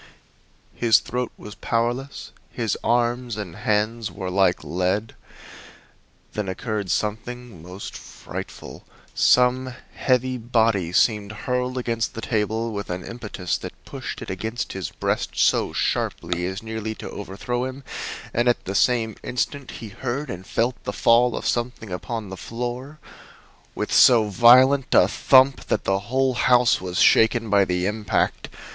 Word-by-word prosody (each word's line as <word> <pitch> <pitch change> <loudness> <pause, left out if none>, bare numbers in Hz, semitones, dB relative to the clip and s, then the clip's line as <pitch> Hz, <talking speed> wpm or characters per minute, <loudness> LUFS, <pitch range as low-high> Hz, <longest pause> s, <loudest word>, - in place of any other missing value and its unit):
His 115 -2 +4
throat 125 0 -3
was 105 - -10
powerless, 120 +6 -2 0.2
his 115 -3 -2
arms 120 0 0
and 100 -6 -6
hands 110 +2 0
were 95 -2 -5
like 95 -3 +2
lead. 90 +7 -1 1.2
Then 105 -3 -3
occurred 105 0 -3
something 110 -1 -3
most 90 +4 -8
frightful. - - -9 0.3
Some 125 +1 +3 0.2
heavy 130 0 +1
body 110 -6 +1
seemed 105 +1 +2
hurled 125 0 -1
against 115 -2 -2
the 115 - -5
table 110 +1 -1
with 100 -1 -5
an 90 +1 -4
impetus 110 -6 -4
that - - -7
pushed - - -6
it - - -6
against 110 +6 -4
his 95 -4 -4
breast - - -2
so - - +3
sharply 90 +1 -1
as 95 +3 -5
nearly 110 -1 -4
to - - -8
overthrow 105 +5 -4
him, 130 +1 -7 0.5
and 120 +1 +1
at 120 - +1
the 95 - -3
same 110 0 +2
instant 135 +2 -3
he 110 - -8
heard 125 +5 -4
and 90 +1 -8
felt 120 +2 -1
the - - -4
fall 120 +1 +4
of - - -6
something 120 -4 -2
upon 105 +3 -4
the 95 - -7
floor 125 +7 -5 0.8
with - - -3
so 120 -3 +7
violent 130 +6 +6
a - - +7
thump 130 0 +4
that - - 0
the 95 0 +1
whole 130 +1 +2
house 125 -2 +3
was 90 -1 -4
shaken 115 -1 +4
by 100 -1 +5
the 90 -1 -1
impact. 105 0 -1
115 Hz, 145 wpm, -23 LUFS, 100-125 Hz, 1.2 s, so